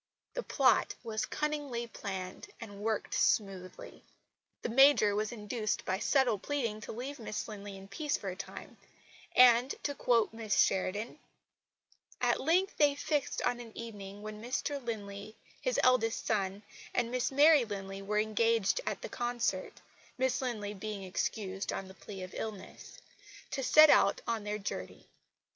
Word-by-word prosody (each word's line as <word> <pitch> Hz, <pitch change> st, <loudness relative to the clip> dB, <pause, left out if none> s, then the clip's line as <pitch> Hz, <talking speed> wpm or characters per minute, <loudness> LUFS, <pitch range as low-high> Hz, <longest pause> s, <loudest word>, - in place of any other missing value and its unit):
The -, -, -2 dB
plot -, -, +3 dB
was 220 Hz, -2 st, -2 dB
cunningly 290 Hz, -6 st, -2 dB
planned 190 Hz, -5 st, -6 dB
and 205 Hz, -3 st, -9 dB
worked 220 Hz, 0 st, -1 dB
smoothly. 190 Hz, -3 st, -1 dB, 0.6 s
The -, -, -1 dB
Major 260 Hz, -4 st, +6 dB
was 215 Hz, +1 st, -1 dB
induced 215 Hz, -1 st, -3 dB
by 190 Hz, +1 st, -1 dB
subtle 255 Hz, -4 st, +2 dB
pleading 230 Hz, -5 st, -2 dB
to -, -, -7 dB
leave 260 Hz, +5 st, -6 dB
Miss 215 Hz, -2 st, -4 dB
Linley 205 Hz, -2 st, -8 dB
in 195 Hz, 0 st, -11 dB
peace 295 Hz, +8 st, -2 dB
for 195 Hz, -, -5 dB
a 180 Hz, -, -5 dB
time; 195 Hz, -, -9 dB, 0.6 s
and, 250 Hz, +1 st, +6 dB
to 285 Hz, -, -1 dB
quote 235 Hz, -5 st, +2 dB
Miss 220 Hz, -3 st, -1 dB
Sheridan: 205 Hz, +8 st, +1 dB, 1.0 s
"At -, -, +2 dB
length 360 Hz, +6 st, +2 dB
they 290 Hz, -2 st, +4 dB
fixed 290 Hz, 0 st, -1 dB
on 245 Hz, 0 st, 0 dB
an 230 Hz, -2 st, -10 dB
evening 205 Hz, -3 st, -8 dB
when 215 Hz, 0 st, -7 dB
Mr 265 Hz, +3 st, -2 dB
Linley, 210 Hz, -2 st, -6 dB, 0.3 s
his -, -, 0 dB
eldest 240 Hz, -3 st, +3 dB
son 200 Hz, -1 st, -1 dB, 0.3 s
and 240 Hz, -1 st, +1 dB
Miss 250 Hz, +1 st, 0 dB
Mary 295 Hz, 0 st, +6 dB
Linley 195 Hz, -3 st, -6 dB
were 210 Hz, +2 st, -2 dB
engaged 220 Hz, -, +2 dB
at -, -, -3 dB
the -, -, -3 dB
concert 240 Hz, -6 st, -2 dB, 0.4 s
(Miss 260 Hz, 0 st, +1 dB
Linley 215 Hz, -5 st, -3 dB
being 205 Hz, 0 st, -5 dB
excused 190 Hz, +1 st, -2 dB
on 195 Hz, -, -4 dB
the 190 Hz, -, -11 dB
plea 195 Hz, 0 st, -9 dB
of 185 Hz, -, -9 dB
illness) 215 Hz, -, -7 dB, 0.5 s
to 270 Hz, -, -2 dB
set 305 Hz, +3 st, +8 dB
out 200 Hz, -, +4 dB
on 225 Hz, -3 st, -2 dB
their 210 Hz, 0 st, -2 dB
journey. 210 Hz, -, -6 dB
220 Hz, 155 wpm, -32 LUFS, 200-250 Hz, 1.0 s, set